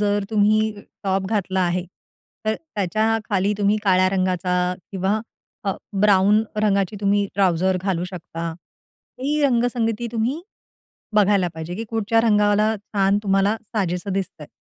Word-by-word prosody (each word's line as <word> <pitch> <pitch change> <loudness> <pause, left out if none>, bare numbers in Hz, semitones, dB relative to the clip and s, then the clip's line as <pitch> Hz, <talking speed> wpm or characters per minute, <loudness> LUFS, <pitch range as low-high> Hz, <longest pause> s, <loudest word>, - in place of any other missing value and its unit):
जर 205 -1 +1
तुम्ही 215 0 +3 0.3
टॉप 190 0 0
घातला 190 -3 0
आहे. 180 0 0 0.6
तर 215 0 +1
त्याच्याखाली 215 - -1
तुम्ही 205 +1 +3
काळ्या 185 -1 +4
रंगाचा 185 -1 0 0.4
किंवा 195 +3 0 0.4
अ, 195 - +1 0.3
ब्राउन 205 +1 +5 0.2
रंगाची 200 -1 +1
तुम्ही 200 0 +2
ट्राउझर 185 -1 +2
घालू 185 -3 -1
शकता 170 -2 -6 0.7
ही 295 +3 0
रंगसंगती 240 -3 +1
तुम्ही 240 +7 -1 0.7
बघायला 200 -3 +4
पाहिजे, 160 +2 -6
की 225 +4 -4
कुठच्या 225 0 +2
रंगाला 210 -1 +3
छान 200 -1 0
तुम्हाला 195 +1 +2 0.2
साजेसं 185 -1 -1
दिसतंय. 190 -5 -4
200 Hz, 125 wpm, -22 LUFS, 190-215 Hz, 0.7 s, ब्राउन